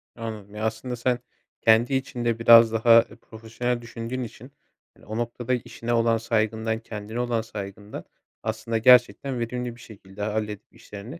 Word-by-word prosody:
Anladım. 110 -3 -7
Ya, 110 - -3
aslında 110 +3 -3
sen 125 +1 0 0.4
kendi 115 +4 +4
içinde 120 -3 -1
biraz 115 -1 +8
daha 115 +1 +6 0.2
profesyonel 115 +2 -4
düşündüğün 115 +2 -5
için, 120 +3 -10 0.4
hani, - - -21
o 110 +1 -5
noktada, 120 +1 -2
işine 120 -1 -3
olan 115 -1 +3
saygından, 110 0 -1
kendine 110 +1 -7
olan 120 -2 0
saygından, 105 -1 -8 0.4
aslında, 110 +1 -2
gerçekten 125 +2 +4
verimli 120 0 -4
bir - - -18
şekilde 100 -2 -12
halledip 105 +1 -4
işlerini 110 +11 -10
115 Hz, 145 wpm, -25 LUFS, 110-120 Hz, 0.4 s, biraz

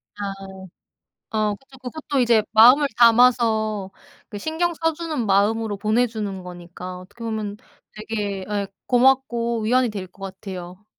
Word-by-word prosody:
아. 205 - -6 1.1
어 210 -1 +1
그쵸. 265 +3 -17
그것도 275 +1 -3
이제 230 -3 +4
마음을 250 +6 +7
담아서 225 -4 +4 0.4
그 210 - -8
신경 325 +8 -1
써 325 0 0
주는 310 -6 -3
마음으로 205 +2 +1
보내 225 +4 +2
주는 205 -4 -5
거니까 180 +1 -9
어떻게 205 +6 -12
보면 215 -2 -3 0.4
되게 210 -3 -4
예 205 -1 -1 0.2
고맙고 240 -3 +2
위안이 250 +3 +2
될 195 -3 -6
것 195 +2 -18
같아요. 190 -1 -8
220 Hz, 280 characters per minute, -22 LUFS, 200-245 Hz, 1.1 s, 마음을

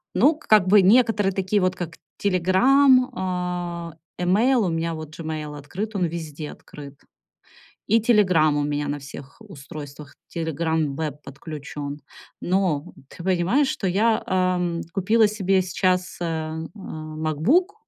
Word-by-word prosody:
ну, 305 +2 +4
как 215 -11 +3
бы 200 +2 +7
некоторые, 210 0 +4
такие 195 +2 0
вот 185 0 +1
как 170 -2 -6 0.2
"Телеграм", 250 +8 +4 0.8
э, 165 +2 -10
имейл. 220 +6 +3
У - - 0
меня 165 0 -2
вот 155 -1 -9
Gmail 155 -2 -5
открыт, 195 +10 -6
он 185 -3 +1
везде 155 -3 -6
открыт. 140 -1 -12 0.9
И 225 +3 +4
"Телеграм" 185 -10 +3
у 145 - +1
меня 145 0 -2
на 145 0 -2
всех 140 0 -11
устройствах, 145 -6 -10
"Телеграм 160 -2 -1
Веб" 150 -2 -4
подключён. 145 0 -7 0.4
Но, 180 -4 0 0.2
ты 170 - -11
понимаешь, 190 +10 +2
что 195 - -2
я, 220 +5 +2
эм, 180 -2 0
купила 215 +4 +3
себе 195 -3 +1
сейчас, 185 0 0
э, - - -2
э, 160 -1 -3 0.2
"МакБук", 160 - -1
175 Hz, 135 wpm, -23 LUFS, 155-205 Hz, 0.9 s, бы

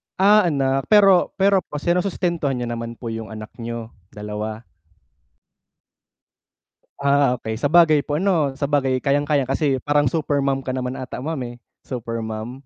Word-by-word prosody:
Ah, 205 0 +5
anak 135 -3 0
pero 195 -4 +5
pero 195 0 +3
po 165 - -10
sinusustentuhan 175 -3 0
niyo 120 -1 -3
naman 115 0 -5
po 115 -1 -6
yung 115 -1 -5
anak 110 +1 -9
niyo, 115 -1 -6 0.2
dalawa? 105 +2 -6 2.4
Ah, 140 -2 +2
okey 110 -2 -5
sabagay 155 0 +5
po 145 +1 -3
'no, 160 -7 +1
sabagay 140 -2 +1
kayang-kayang 145 +1 +1
kasi 135 +1 0
parang 145 -2 +2
super 145 -1 0
mom 135 -1 -1
ka 130 - -2
naman 125 0 -3
ata 130 -1 -6
ma'am 160 +4 -3 0.2
eh, - - -13 0.3
super 115 -3 -4
mom. 110 +5 -7
135 Hz, 145 wpm, -21 LUFS, 120-155 Hz, 2.4 s, Ah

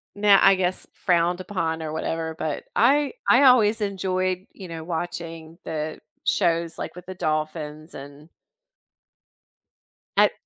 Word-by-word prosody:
now, 205 -1 +5
I 195 - +7
guess 185 0 -2
frowned 175 0 +1
upon 165 -4 -2
or 155 -1 -4
whatever, 160 0 -3
but 155 -2 -3
I 280 - +3 0.2
I - - +6
always 230 -4 +5
enjoyed, 185 -1 -1
you 190 -3 -10
know, 165 -1 -7
watching 165 -1 -5
the 155 0 -4 0.3
shows, 170 0 +1
like, - - -6
with 180 - -11
the 185 - -7
dolphins 155 -1 -3
and 145 +3 -11 1.9
at - - +6
170 Hz, 130 wpm, -24 LUFS, 160-190 Hz, 1.9 s, I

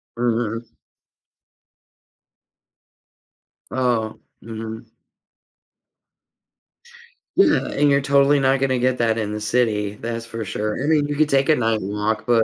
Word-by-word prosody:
Mhm. 115 -1 -2 2.9
Oh, 120 -4 0 0.2
mhm. 110 0 -7 2.5
Yeah, 365 -6 +3
and 145 0 +1
you're 140 0 +3
totally 140 +1 +3
not 135 0 +2
gonna 130 -2 +1
get 130 0 +1
that 115 -1 +1
in 105 -2 -2
the 105 0 -4
city, 105 -3 0
that's 115 +1 -5
for 115 -1 -5
sure. 105 +5 -3
I - - -1
mean, 150 -2 +2
you 145 - -3
could 150 0 +2
take 135 +2 +2
a 155 - +6
night 115 -3 0
walk, 105 +3 -2
but 120 -2 +3
120 Hz, 125 wpm, -21 LUFS, 110-135 Hz, 2.9 s, a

